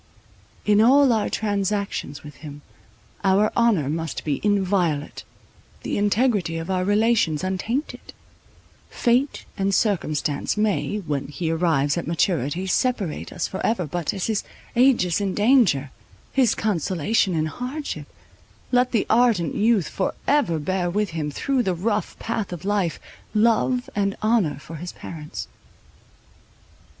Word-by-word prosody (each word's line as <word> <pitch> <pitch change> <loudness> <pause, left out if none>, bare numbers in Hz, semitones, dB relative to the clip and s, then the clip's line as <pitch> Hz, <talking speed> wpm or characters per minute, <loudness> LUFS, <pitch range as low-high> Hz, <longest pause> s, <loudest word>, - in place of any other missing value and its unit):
In 210 0 +4
all 265 +2 +6
our 220 -2 0
transactions 200 -7 -2
with 150 0 -11
him 145 -2 -10 0.6
our 200 +2 +3
honour 225 - +3
must 160 +2 -3
be 145 -3 -1
inviolate, 185 -7 0 0.6
the - - -2
integrity 205 -5 +1
of 165 +3 -4
our 185 -1 +1
relations 205 -6 +2
untainted: 210 +10 -3 0.8
fate 250 +4 +1
and 195 0 +1
circumstance 155 -7 0
may, 210 -1 0
when 145 -3 -2
he 160 +3 -3
arrives 160 -2 +1
at - - -6
maturity, 170 0 0
separate 195 - -1
us - - -2
for 190 - -5
ever—but, 175 -6 -1
as 195 -3 -3
his 220 -2 -1 0.3
aegis 235 -8 +3
in 195 -2 -1
danger, 205 - +3 0.4
his 255 -5 +3
consolation 190 0 0
in 155 -1 +1
hardship, 255 - -5 0.6
let 250 0 +2
the 225 - +2
ardent 225 -9 +3
youth 215 -4 +2
for 190 - -2
ever 280 - +2
bear 175 +4 -1
with 205 +2 -1
him 155 -2 -3
through 265 - 0
the 190 -6 0
rough 205 +2 -2
path 225 -4 -3
of 175 +1 -7
life, 195 -6 0 0.4
love 235 +3 +2
and 200 -1 0
honour 215 -10 +2
for 160 +3 -9
his 175 +3 -7
parents. 150 -3 -7
195 Hz, 135 wpm, -23 LUFS, 165-225 Hz, 0.8 s, all